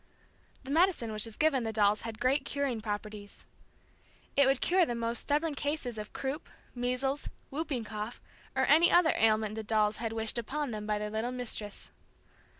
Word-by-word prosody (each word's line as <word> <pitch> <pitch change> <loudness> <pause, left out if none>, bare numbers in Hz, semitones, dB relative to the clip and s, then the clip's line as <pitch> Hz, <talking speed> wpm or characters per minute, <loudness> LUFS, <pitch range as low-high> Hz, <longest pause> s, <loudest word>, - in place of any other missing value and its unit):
The 270 - -6
medicine 325 -8 +3
which 215 0 0
was 225 -2 -6
given 300 -5 +3
the 225 - -2
dolls 210 -1 +3
had 225 -1 -6
great 260 +3 +2
curing 275 -5 -2
properties. 210 -1 -6 0.9
It 280 -1 +6
would 270 -1 +3
cure 365 +1 +4
the 240 -7 -1
most 230 0 -1
stubborn 300 +2 0
case 290 +1 -2
of 220 -4 -5
croup, 275 +4 -4 0.2
measles, 255 +3 -1 0.2
whooping 275 -4 -2
cough 215 +2 -5 0.4
or - - +3
any 330 +3 +6
other 345 -2 +5
ailment 215 -1 +3
the 220 - -4
dolls 215 -1 +1
had 225 -1 -3
wished 225 +1 0
upon 280 +4 -3
them 210 -1 -5
by 210 -1 +1
their 210 0 -4
little 220 +3 -2
Mistress. 230 -5 -4
235 Hz, 175 wpm, -31 LUFS, 215-280 Hz, 0.9 s, It